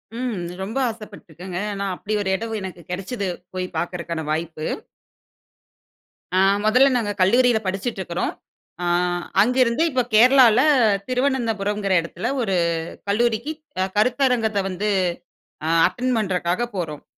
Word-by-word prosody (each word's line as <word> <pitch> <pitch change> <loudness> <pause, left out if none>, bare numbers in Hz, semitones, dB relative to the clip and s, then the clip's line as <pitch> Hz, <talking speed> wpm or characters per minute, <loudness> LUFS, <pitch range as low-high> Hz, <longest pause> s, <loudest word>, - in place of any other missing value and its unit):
ம். 245 -1 -2 0.3
ரொம்ப 215 +6 -5
ஆசைப்பட்டுருக்கேங்க. 190 -5 -9
ஏன்னா, 200 0 -3
அப்படி 210 +4 -5
ஒரு 195 - -2
இடம் 225 +2 -4
எனக்கு 185 -2 -7
கெடைச்சது, 195 +3 -3 0.3
போய் 185 0 -2
பார்க்கறக்கான 170 -1 -3
வாய்ப்பு. 160 0 -3 1.7
ஆ - - +3 0.3
முதல்ல 250 +5 +5
நாங்க 215 -4 -1
கல்லூரியில 240 +4 +4
படிச்சிட்டு 195 +4 -3
இருக்கிறோம். 175 -1 -2 0.5
அ - - -1 0.6
அங்கிருந்து 250 +4 +3
இப்ப 255 -2 +2
கேரளால 245 0 +7 0.5
திருவனந்தபுரம்ங்கிற 225 -7 0
இடத்தில 170 +8 -4
ஒரு 195 -5 0 0.5
கல்லூரிக்கு 235 +6 +1 0.3
அ - - +1
கருத்தரங்கத்த 240 -2 +2
வந்து 195 +3 -2 0.8
அ - - 0 0.2
அட்டெண்ட் 245 +6 -1
பண்ணுறக்காக 185 +2 -1
போறோம். 155 -5 -4
210 Hz, 115 wpm, -22 LUFS, 185-240 Hz, 1.7 s, கேரளால